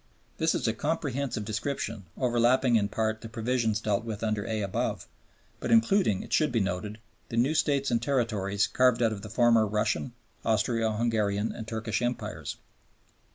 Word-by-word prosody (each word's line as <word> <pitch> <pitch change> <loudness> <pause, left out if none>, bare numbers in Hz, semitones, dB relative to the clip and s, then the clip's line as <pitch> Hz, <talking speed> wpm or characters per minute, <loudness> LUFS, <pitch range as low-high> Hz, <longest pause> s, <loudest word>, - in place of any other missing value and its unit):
This 160 0 +2
is - - -1
a 110 - +2
comprehensive 140 -4 -2
description, 110 -2 -3
overlapping 120 0 +3
in 105 -2 +3
part 110 0 -1
the 115 - -8
provisions 115 -1 0
dealt 105 -1 0
with 115 -1 -5
under 110 0 -1
(a) 110 -2 -1
above, 95 - -2 0.5
but - - -4
including, 115 - +3
it - - -7
should 155 -3 +3
be 120 - +1
noted, 100 +2 -2 0.3
the 115 - -4
new 130 +6 +3
States 140 -3 +1
and 115 -1 +2
territories 110 -6 0
carved 125 -2 +3
out 110 -1 +2
of 100 - -7
the 110 - -8
former 115 -1 +4
Russian, 105 +4 -1 0.3
Austro 110 +1 +1
Hungarian, 105 -2 0
and 110 - -7
Turkish 110 -1 -2
Empires. 120 0 -3
115 Hz, 165 wpm, -28 LUFS, 110-125 Hz, 0.5 s, former